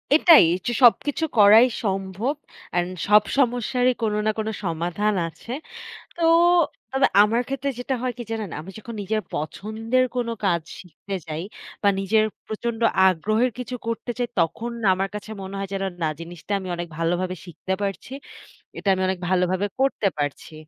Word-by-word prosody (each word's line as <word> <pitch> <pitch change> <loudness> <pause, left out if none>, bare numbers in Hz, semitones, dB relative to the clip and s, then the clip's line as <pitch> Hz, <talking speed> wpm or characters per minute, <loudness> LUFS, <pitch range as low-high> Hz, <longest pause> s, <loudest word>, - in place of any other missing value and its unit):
এটাই 320 - +8
অচ 185 - -7 0.2
সবকিছু 290 +6 +4
করাই 215 +4 +8 0.2
সম্ভব। 195 +6 -2 0.4
অ্যান্ড 175 0 0 0.2
সব 210 +1 +6
সমস্যারই 245 0 +2
কোন 220 -2 0
না 215 - +3
কোন 215 - -2 0.2
সমাধান 175 +4 -1
আছে। 165 +8 -10 0.7
তো 340 - -4 0.7
তবে 265 +1 +3 0.2
আমার 225 +3 +2
ক্ষেত্রে 275 +1 -2
যেটা 255 +2 -2
হয় 255 -1 -1
কি - - -4
জানেন? 220 -4 -3
আমি 170 +5 -9
যখন 230 +2 -8
নিজের 215 +2 -1
পছন্দের 220 +10 -1
কোন 240 -1 -1 0.2
কাজ 170 -4 +2 0.2
শিখতে 190 +2 -9
যাই 155 0 -4 0.4
বা 205 - +4
নিজের 215 +3 +3 0.2
প্রচণ্ড 225 +1 -4 0.3
আগ্রহের 215 +7 +2
কিছু 250 0 -5
করতে 230 +1 -3
চাই, 245 - -1
তখন 180 +8 0 0.2
আমার 190 +1 -1
কাছে 210 +1 -7
মনে 190 +1 -7
হয় 195 -1 -4
যেন 195 0 -2 0.2
না 160 - +2
জিনিসটা 170 +3 -8
আমি 185 -1 -7
অনেক 175 0 -5
ভালোভাবে 175 +2 0
শিখতে 185 +1 -6
পারছি। 200 +6 -4 0.6
এটা - - -4
আমি 190 - -2
অনেক 185 -1 -1
ভালোভাবে 185 +1 +1
করতে 270 -6 +1
পারছি। 145 +2 -4
205 Hz, 160 wpm, -23 LUFS, 185-235 Hz, 0.7 s, এটাই